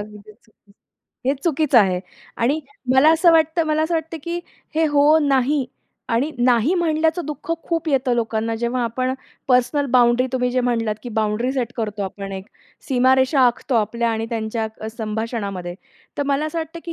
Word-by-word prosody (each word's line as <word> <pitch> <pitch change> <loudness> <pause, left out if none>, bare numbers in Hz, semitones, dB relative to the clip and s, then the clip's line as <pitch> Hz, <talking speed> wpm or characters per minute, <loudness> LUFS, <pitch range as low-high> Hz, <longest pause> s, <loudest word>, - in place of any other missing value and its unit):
अगदी 210 0 -9
चुकीचं, 215 0 -21 0.6
हे 275 - +3
चुकीचं 300 -5 +3
आहे 185 -4 +2 0.4
आणि 280 +7 +1 0.3
मला 295 +4 +6
असं 335 +1 +5
वाटतं 320 +1 +3
मला 310 0 +1
असं 330 +2 -1
वाटतं 325 0 -3
की 340 +1 -2 0.4
हे 320 - +2
हो, 295 +1 +4
नाही 275 -2 +1 0.4
आणि 250 +6 +1
नाही 245 +6 +3
म्हणल्याचं 325 0 +1
दुःख 300 +2 -7
खूप 330 -1 -2
येतं 260 -3 +1
लोकांना 225 -1 -1
जेव्हा 240 +2 -1
आपण 255 +3 -1 0.4
पर्सनल 260 +3 +2
बाउंड्री 245 0 +4
तुम्ही 250 -1 0
जे 255 +1 +1
म्हटलात 230 -3 0
की 245 - -6
बाउंड्री 220 +4 0
सेट 245 -3 -2
करतो 210 -3 -3
आपण 195 +1 -6
एक 190 0 -7 0.4
सीमारेषा 260 +2 +3
आखतो 245 +1 -1
आपल्या 230 +2 +1
आणि 225 0 -2
त्यांच्या 220 -1 -4
संभाषणामध्ये, 210 -5 -4 0.4
तर - - +2
मला 285 +2 +1
असं 320 +2 -4
वाटतं 325 +1 -6
की 335 - -5
250 Hz, 165 wpm, -21 LUFS, 225-300 Hz, 0.6 s, मला